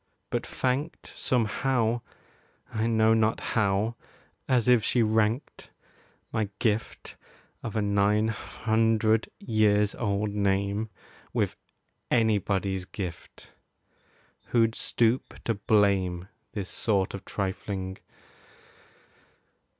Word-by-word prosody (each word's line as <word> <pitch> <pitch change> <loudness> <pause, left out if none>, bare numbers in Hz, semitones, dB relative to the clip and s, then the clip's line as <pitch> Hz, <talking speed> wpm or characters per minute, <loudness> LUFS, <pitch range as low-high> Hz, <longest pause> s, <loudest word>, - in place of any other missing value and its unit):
but - - 0
thanked 135 +5 -2
Somehow 120 0 +1 0.7
I 110 0 0
know 110 -1 +4
not 110 0 +2
how 105 +1 +2 0.6
as 125 -3 +3
if 125 -3 +5
she 120 - +2
ranked 110 +4 0 0.6
My 110 -3 0
gift 110 -1 -2 0.4
of 115 -1 -5
a 110 - +1
nine 105 +2 +2
hundred 110 0 +1
years 105 -2 +2
old 105 -2 -1
name 100 +1 0 0.4
With - - 0 0.5
anybody's 100 -4 +1
gift. 90 -3 -8 0.9
Who'd 115 -2 +2
stoop 115 +2 0
to 115 - +1
blame 100 -4 +2 0.3
This 100 -3 -4
sort 100 -4 +1
of 100 - -6
trifling? 95 -1 -4
110 Hz, 95 wpm, -27 LUFS, 100-115 Hz, 0.9 s, if